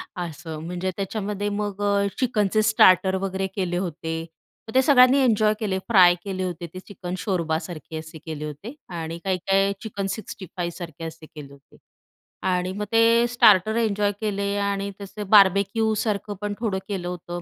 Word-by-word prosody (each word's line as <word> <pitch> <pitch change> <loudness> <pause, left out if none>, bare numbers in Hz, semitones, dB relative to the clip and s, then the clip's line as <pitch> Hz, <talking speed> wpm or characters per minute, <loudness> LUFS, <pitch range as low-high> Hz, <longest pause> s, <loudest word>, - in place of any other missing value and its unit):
असं 165 -2 -6
म्हणजे 180 +2 -3
त्याच्यामध्ये 205 0 -3
मग 205 -1 -3
अ, 200 0 +2
चिकनचे 215 -4 +1
स्टार्टर 190 -4 +5
वगैरे 190 0 -2
केले 180 -3 -1
होते, 165 -2 -3 0.5
मग - - -7
ते 260 - +7
सगळ्यांनी 260 -1 +6
एन्जॉय 215 -3 +3
केले. 195 -4 -1
फ्राय 180 -6 +6
केले 190 -2 -3
होते 175 -1 -4
ते 185 - -7
चिकन 180 -2 -6
शोरबासारखे 165 -4 -3
असे 160 +1 -10
केले 155 -2 -5
होते 150 - -8 0.2
आणि 165 +1 -5
काही-काही 195 +1 +1
चिकन 200 -3 -4
सिक्स्टी 200 -2 -8
फाईव्ह 170 -2 -5
असे 160 0 -11
केले 150 -3 -11
होते 140 0 -20 0.7
आणि 180 0 0
मग 210 - -2
ते 230 +1 +4
स्टार्टर 215 -3 +5
एन्जॉय 210 -3 +1
केले 200 -2 -1
आणि 200 0 -1
तसे 205 +2 -7
बार्बेक्यूसारखं 205 +1 +3
पण 205 0 -2
थोडं 215 -5 -1
केलं 190 -4 -4
होतं. 175 0 -6
195 Hz, 155 wpm, -24 LUFS, 175-210 Hz, 0.7 s, ते